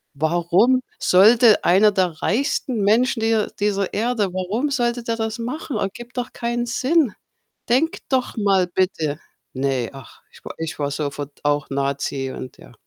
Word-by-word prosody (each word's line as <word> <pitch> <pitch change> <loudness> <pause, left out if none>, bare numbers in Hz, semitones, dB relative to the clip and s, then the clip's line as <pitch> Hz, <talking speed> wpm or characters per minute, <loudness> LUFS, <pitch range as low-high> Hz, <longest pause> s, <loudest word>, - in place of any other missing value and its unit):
Warum 175 - +2 0.2
sollte 220 +4 +5
einer 200 +4 +5
der 185 -2 +2
reichsten 245 -1 0
Menschen 225 +4 +2
dieser 225 -1 +1
dieser 200 -1 -1
Erde 220 -3 0
warum 205 +10 -1
sollte 240 -2 0
der 230 -1 -2
das 220 0 -3
machen? 250 +1 -4
Ergibt 240 +6 -5
doch 245 - -3
keinen 240 0 -2
Sinn. 260 - +1 0.6
Denkt 290 +7 +1
doch 260 -2 0
mal 195 -3 +2
bitte.“ 165 -5 -1 0.3
Ne, 130 -3 -1
ach, 135 -3 -13
ich - - -18
wa - - -7
ich 160 -1 -5
war 145 - -1
sofort 145 -1 -5
auch 145 -1 0
Nazi 140 -1 -2
und 130 - -9
ja. - - -16
205 Hz, 155 wpm, -21 LUFS, 160-240 Hz, 0.6 s, sollte